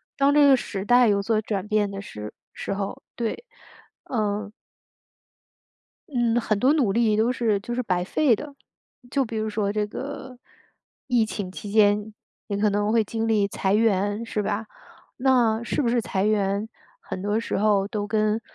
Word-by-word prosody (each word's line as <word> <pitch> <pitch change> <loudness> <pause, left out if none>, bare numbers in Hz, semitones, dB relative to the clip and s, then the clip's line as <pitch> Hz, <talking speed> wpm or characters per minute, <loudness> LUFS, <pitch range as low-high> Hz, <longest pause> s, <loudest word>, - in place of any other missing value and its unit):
当 280 +1 +3
这 295 -1 +6
个 270 - +7
时 200 -5 -4
代 245 0 +5
有 200 -1 +2
所 220 0 +1
转 205 -2 -3
变 210 -2 +1
的 195 0 -6
时 105 - -8 0.2
时 - - -4
候， 195 0 -4
对。 235 - -3 0.6
嗯 210 -3 -2 1.6
嗯， 240 -3 +1
很 215 -2 0
多 270 +6 +4
努 255 -11 +2
力 220 -1 +2
都 225 +3 +2
是 220 -5 +1
就 240 +4 -5
是 250 - 0
白 180 -4 0
费 250 +4 +2
的。 285 +4 -9 0.5
就 270 +1 +1
比 225 - -7
如 215 0 -1
说 210 -1 -1
这 210 0 0
个， 260 +1 -7 0.7
疫 240 -3 +3
情 200 -4 -5
期 200 +1 -8
间， 210 0 +3 0.3
也 200 - -2
可 210 0 +2
能 205 +1 0
会 225 -1 +3
经 225 +2 -3
历 210 -3 +2
裁 190 0 -1
员， 205 0 +1
是 215 -2 -2
吧？ 210 +2 -2 0.5
那 240 -4 +3
是 290 - -1
不 235 - +1
是 240 -1 +2
裁 195 -2 -1
员， 205 0 +1 0.3
很 185 - -6
多 205 +2 0
时 - - -3
候 200 -1 +2
都 205 -1 -3
跟 215 +1 +1
215 Hz, 190 characters per minute, -24 LUFS, 205-235 Hz, 1.6 s, 个